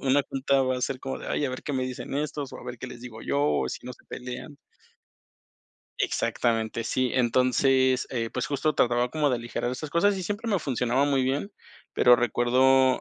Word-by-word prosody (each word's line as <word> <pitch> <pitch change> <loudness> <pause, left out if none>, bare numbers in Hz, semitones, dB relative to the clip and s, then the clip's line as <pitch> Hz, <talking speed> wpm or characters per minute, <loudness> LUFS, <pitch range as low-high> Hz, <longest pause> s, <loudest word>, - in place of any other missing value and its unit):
una 140 +1 +3
junta, 135 0 +2
va 130 0 0
a - - -6
ser 130 +1 -1
como 135 - -4
de: - - -9
"Ay, - - 0
a 135 - -1
ver 130 - -6
qué 145 - -4
me 130 - 0
dicen 130 +1 -6
estos, 145 -1 -3
o - - -8
a - - -11
ver 120 -1 -7
qué 130 - -6
les 120 -1 -10
digo 110 -3 -9
yo, 140 +1 0
o - - +1
si - - -6
no 125 - -5
se - - -18
pelean". 125 +4 -7 1.4
Exactamente, 115 -1 0
sí. 125 +2 0
Entonces, 130 +1 +3
eh, 115 -3 -2
pues - - -2
justo 150 +2 0
trataba 120 0 +2
como 150 -1 +1
de - - +2
aligerar 120 +1 -3
esas 145 +4 -5
cosas, 195 +6 +3
y 190 - -4
siempre 205 +5 -4
me 200 -5 +1
funcionaba 130 -1 +1
muy 135 -2 +2
bien, 140 +10 -1 0.4
pero 125 0 +6
recuerdo 130 +3 +3
130 Hz, 210 wpm, -26 LUFS, 125-140 Hz, 1.4 s, pero